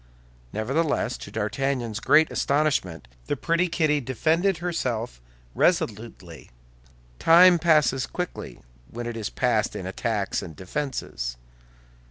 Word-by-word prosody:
Nevertheless, 140 Hz, +8 st, -1 dB
to -, -, -9 dB
D'Artagnan's 115 Hz, 0 st, -2 dB
great 155 Hz, +5 st, +4 dB
astonishment, 140 Hz, -, 0 dB, 0.2 s
the -, -, -1 dB
pretty 170 Hz, +2 st, +1 dB
Kitty 155 Hz, -3 st, +1 dB
defended 160 Hz, -, +1 dB
herself 125 Hz, -, -3 dB, 0.3 s
resolutely. 105 Hz, -, -1 dB, 0.7 s
Time 175 Hz, +1 st, +7 dB
passes 150 Hz, -6 st, +3 dB
quickly 180 Hz, -1 st, -6 dB, 0.3 s
when 120 Hz, +1 st, -6 dB
it 120 Hz, -1 st, -4 dB
is 110 Hz, -3 st, -4 dB
passed -, -, 0 dB
in -, -, -5 dB
attacks -, -, -2 dB
and 80 Hz, -, -9 dB
defenses. 90 Hz, -, -4 dB
135 Hz, 110 wpm, -25 LUFS, 110-165 Hz, 0.7 s, Time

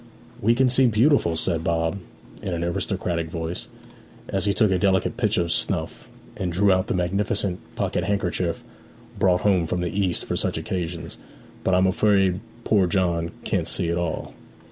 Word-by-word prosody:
'We 115 Hz, +3 st, +3 dB
can 130 Hz, +1 st, +3 dB
see 130 Hz, +1 st, +4 dB
beautifully,' 115 Hz, -, +3 dB
said 80 Hz, 0 st, 0 dB
Bob, 85 Hz, +3 st, 0 dB, 0.4 s
in 90 Hz, -, -3 dB
an 85 Hz, -, -2 dB
aristocratic 85 Hz, -1 st, -2 dB
voice, 80 Hz, +1 st, -5 dB, 0.6 s
as 95 Hz, +1 st, 0 dB
he 100 Hz, -, +3 dB
took 110 Hz, -3 st, +3 dB
a 95 Hz, -, +2 dB
delicate 95 Hz, -1 st, +2 dB
pinch 110 Hz, -2 st, +1 dB
of 85 Hz, -1 st, 0 dB
snuff, -, -, -2 dB, 0.3 s
and 90 Hz, -2 st, -2 dB
drew 95 Hz, +3 st, +3 dB
out 95 Hz, 0 st, +2 dB
the -, -, -1 dB
magnificent 95 Hz, +1 st, 0 dB, 0.2 s
pocket -, -, -1 dB
handkerchief 90 Hz, -3 st, -1 dB, 0.6 s
brought 90 Hz, -2 st, +3 dB
home 95 Hz, -5 st, +2 dB
from 90 Hz, +2 st, -1 dB
the 85 Hz, -, -2 dB
East 95 Hz, -3 st, 0 dB
for -, -, -2 dB
such -, -, -1 dB
occasions. 85 Hz, -2 st, -4 dB, 0.4 s
'But 95 Hz, -, +2 dB
I -, -, +4 dB
am 95 Hz, -, +4 dB
afraid 95 Hz, -1 st, +3 dB, 0.2 s
poor 100 Hz, -5 st, +3 dB
John 85 Hz, -2 st, 0 dB
can't -, -, -1 dB
see 85 Hz, -, 0 dB
at 85 Hz, -, 0 dB
all.' 85 Hz, -2 st, -3 dB
90 Hz, 175 wpm, -24 LUFS, 85-100 Hz, 0.6 s, see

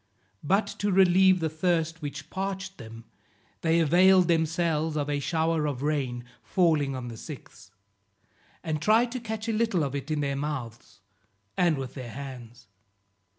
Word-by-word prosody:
But 195 Hz, +7 st, +2 dB
to 205 Hz, 0 st, 0 dB
relieve 185 Hz, 0 st, +5 dB
the 160 Hz, -, +1 dB
thirst 165 Hz, 0 st, -1 dB
which 145 Hz, 0 st, -7 dB
parched 190 Hz, -1 st, -4 dB
them, 115 Hz, -1 st, -10 dB, 0.6 s
they 165 Hz, 0 st, +2 dB
availed 180 Hz, +3 st, +5 dB
themselves 160 Hz, -1 st, +1 dB
of 145 Hz, 0 st, -1 dB
a 145 Hz, -, 0 dB
shower 160 Hz, +1 st, 0 dB
of 140 Hz, -2 st, -4 dB
rain, 130 Hz, -5 st, -1 dB, 0.2 s
falling 155 Hz, -7 st, +1 dB
on 125 Hz, -1 st, -5 dB
the 115 Hz, -, -8 dB
sixth, 140 Hz, -, -11 dB, 0.9 s
and 155 Hz, -2 st, -2 dB
tried 225 Hz, +7 st, +3 dB
to 255 Hz, -, -3 dB
catch 220 Hz, -1 st, -5 dB
a 225 Hz, -, 0 dB
little 215 Hz, -6 st, +1 dB
of 140 Hz, -2 st, -3 dB
it 140 Hz, +1 st, -5 dB
in 155 Hz, -1 st, 0 dB
their 140 Hz, -1 st, -1 dB
mouths 120 Hz, -8 st, -6 dB, 0.5 s
and 170 Hz, -4 st, +2 dB
with 130 Hz, -1 st, -5 dB
their 130 Hz, -3 st, -7 dB
hands. 125 Hz, -4 st, -9 dB
155 Hz, 155 wpm, -27 LUFS, 140-185 Hz, 0.9 s, relieve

